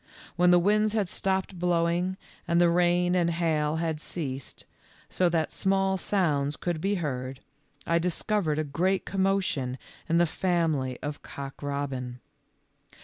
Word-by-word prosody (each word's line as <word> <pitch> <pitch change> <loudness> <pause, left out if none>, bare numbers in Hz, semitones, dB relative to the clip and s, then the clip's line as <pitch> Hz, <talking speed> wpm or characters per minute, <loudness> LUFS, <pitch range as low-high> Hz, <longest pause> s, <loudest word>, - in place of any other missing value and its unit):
When 180 0 +4
the 175 - +7
winds 210 +4 +3
had 210 -5 0
stopped 190 -1 -1
blowing, 175 +1 +1 0.3
and 170 0 +3
the 175 -1 +5
rain 175 +1 +3
and 175 -2 +2
hail 160 -3 0
had 160 -2 -2
ceased, 135 -7 -5 0.5
so 180 -1 +2
that 165 -2 0
small 195 0 +1
sounds 150 -8 0
could 170 -3 -2
be 200 +3 +1
heard, 130 -6 -3 0.5
I 170 0 +2
discovered 175 -1 0
a 155 - +1
great 180 +7 0
commotion 190 -10 0 0.3
in 165 - +3
the 175 - +5
family 160 -7 0
of 145 0 -4
Cock 140 -1 -8
robin. 135 -3 -3
170 Hz, 145 wpm, -27 LUFS, 150-185 Hz, 0.5 s, the